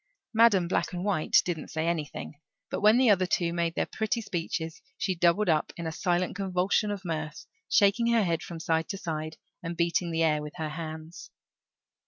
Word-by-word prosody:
Madam 220 Hz, -6 st, +5 dB
Black 185 Hz, -, -1 dB
and 180 Hz, +1 st, -3 dB
White 190 Hz, -7 st, +3 dB
didn't 170 Hz, -4 st, -3 dB
say 160 Hz, 0 st, -2 dB
anything; 160 Hz, -4 st, -3 dB, 0.4 s
but -, -, -2 dB
when 215 Hz, +3 st, +6 dB
the 250 Hz, -3 st, +5 dB
other 185 Hz, -2 st, +3 dB
two 170 Hz, -1 st, 0 dB
made 170 Hz, -1 st, -1 dB
their -, -, +1 dB
pretty 220 Hz, +2 st, -2 dB
speeches 165 Hz, -5 st, -4 dB, 0.2 s
she 190 Hz, -, 0 dB
doubled 175 Hz, +4 st, +2 dB
up 155 Hz, -3 st, +2 dB
in 170 Hz, -, -5 dB
a 160 Hz, -, -2 dB
silent 180 Hz, +2 st, 0 dB
convulsion 190 Hz, +2 st, +1 dB
of 200 Hz, -2 st, -4 dB
mirth, 155 Hz, -3 st, -4 dB, 0.2 s
shaking 210 Hz, +3 st, +4 dB
her 235 Hz, -2 st, +4 dB
head 170 Hz, -3 st, 0 dB
from 170 Hz, -2 st, -7 dB
side 160 Hz, 0 st, 0 dB
to 195 Hz, -, -3 dB
side 155 Hz, -3 st, -4 dB, 0.2 s
and 170 Hz, 0 st, -5 dB
beating 170 Hz, +1 st, +1 dB
the 165 Hz, 0 st, +1 dB
air 150 Hz, -2 st, +2 dB
with 150 Hz, 0 st, -7 dB
her 160 Hz, -2 st, -3 dB
hands. 160 Hz, +1 st, -7 dB
170 Hz, 195 wpm, -28 LUFS, 160-195 Hz, 0.4 s, when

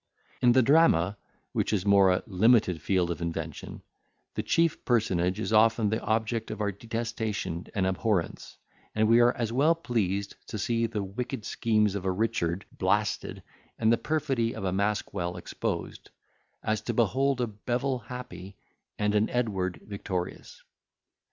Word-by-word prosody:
In 120 Hz, -1 st, +5 dB
the 130 Hz, 0 st, +5 dB
drama, 115 Hz, -, +4 dB, 0.4 s
which -, -, 0 dB
is 100 Hz, -4 st, +1 dB
a -, -, -7 dB
more 95 Hz, -2 st, +5 dB
limited 105 Hz, -4 st, +3 dB
field 90 Hz, -1 st, +1 dB
of 85 Hz, -, -5 dB
invention, 80 Hz, -2 st, -5 dB, 0.5 s
the -, -, -2 dB
chief 165 Hz, -1 st, +1 dB
personage 95 Hz, -6 st, +1 dB
is 110 Hz, -, -2 dB
often 110 Hz, 0 st, +4 dB
the 110 Hz, +2 st, -1 dB
object 110 Hz, +1 st, -1 dB
of -, -, -5 dB
our 105 Hz, -1 st, 0 dB
detestation 110 Hz, -4 st, -4 dB
and 95 Hz, -2 st, +1 dB
abhorrence; 95 Hz, -1 st, -1 dB, 0.4 s
and 110 Hz, 0 st, +3 dB
we 115 Hz, +2 st, +6 dB
are 120 Hz, 0 st, +6 dB
as 115 Hz, -2 st, -2 dB
well 150 Hz, +6 st, +4 dB
pleased 100 Hz, -, -2 dB
to -, -, -5 dB
see 115 Hz, +3 st, 0 dB
the 110 Hz, -3 st, -3 dB
wicked 115 Hz, +4 st, -5 dB
schemes 110 Hz, -3 st, +1 dB
of 100 Hz, -2 st, -4 dB
a 95 Hz, -, +2 dB
Richard 95 Hz, -3 st, -1 dB
blasted, -, -, -1 dB, 0.3 s
and 110 Hz, 0 st, +3 dB
the -, -, +6 dB
perfidy 140 Hz, -7 st, -1 dB
of -, -, -6 dB
a 95 Hz, -, 0 dB
Maskwell 95 Hz, -3 st, -1 dB
exposed, -, -, -4 dB, 0.5 s
as 110 Hz, 0 st, 0 dB
to 120 Hz, -, -3 dB
behold 130 Hz, +4 st, +2 dB
a 125 Hz, -, +2 dB
Bevil 120 Hz, +4 st, -2 dB
happy, 115 Hz, -5 st, -9 dB, 0.4 s
and 105 Hz, 0 st, +1 dB
an 105 Hz, +1 st, +2 dB
Edward 95 Hz, -8 st, -1 dB
victorious. 95 Hz, -3 st, -5 dB
110 Hz, 155 wpm, -28 LUFS, 95-120 Hz, 0.5 s, we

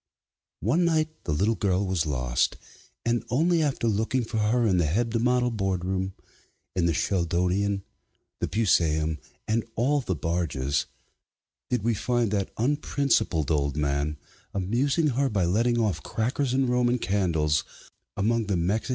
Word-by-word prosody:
One 140 Hz, -, +2 dB
night 160 Hz, -2 st, 0 dB
the -, -, -1 dB
little 100 Hz, +10 st, +2 dB
girl 100 Hz, -2 st, 0 dB
was 90 Hz, -4 st, 0 dB
lost, 60 Hz, -4 st, 0 dB, 0.5 s
and 120 Hz, 0 st, +1 dB
only 165 Hz, +6 st, +2 dB
after 140 Hz, -6 st, 0 dB
looking 110 Hz, +4 st, +1 dB
for 110 Hz, 0 st, -4 dB
her 115 Hz, +3 st, +2 dB
in 95 Hz, -4 st, +3 dB
the 85 Hz, -3 st, +2 dB
Hebdomadal 120 Hz, +6 st, +1 dB
Boardroom, 95 Hz, -2 st, -1 dB, 0.6 s
in 85 Hz, -2 st, +2 dB
the -, -, +3 dB
Sheldonian, 95 Hz, +3 st, 0 dB, 0.6 s
the -, -, -1 dB
Pusaeum, 80 Hz, -7 st, +1 dB, 0.3 s
and 110 Hz, +1 st, +1 dB
all 140 Hz, +5 st, +2 dB
the 95 Hz, -7 st, -2 dB
barges, 75 Hz, -4 st, -1 dB, 0.8 s
did 125 Hz, -5 st, 0 dB
we 115 Hz, +1 st, +2 dB
find 115 Hz, +1 st, 0 dB
that 100 Hz, -3 st, 0 dB
unprincipled 125 Hz, -, +1 dB
old 70 Hz, -1 st, 0 dB
man 70 Hz, +1 st, 0 dB, 0.4 s
amusing 130 Hz, -, +1 dB
her 135 Hz, +1 st, +1 dB
by 100 Hz, -6 st, +1 dB
letting 115 Hz, +7 st, +2 dB
off 110 Hz, -5 st, 0 dB
crackers 125 Hz, +4 st, -1 dB
and 130 Hz, 0 st, +2 dB
Roman 125 Hz, 0 st, +2 dB
candles 85 Hz, -7 st, +1 dB, 0.5 s
among 110 Hz, +2 st, +1 dB
the 100 Hz, -3 st, +1 dB
Mexican 95 Hz, +6 st, 0 dB
MSS. -, -, -8 dB
105 Hz, 145 wpm, -26 LUFS, 85-120 Hz, 0.8 s, in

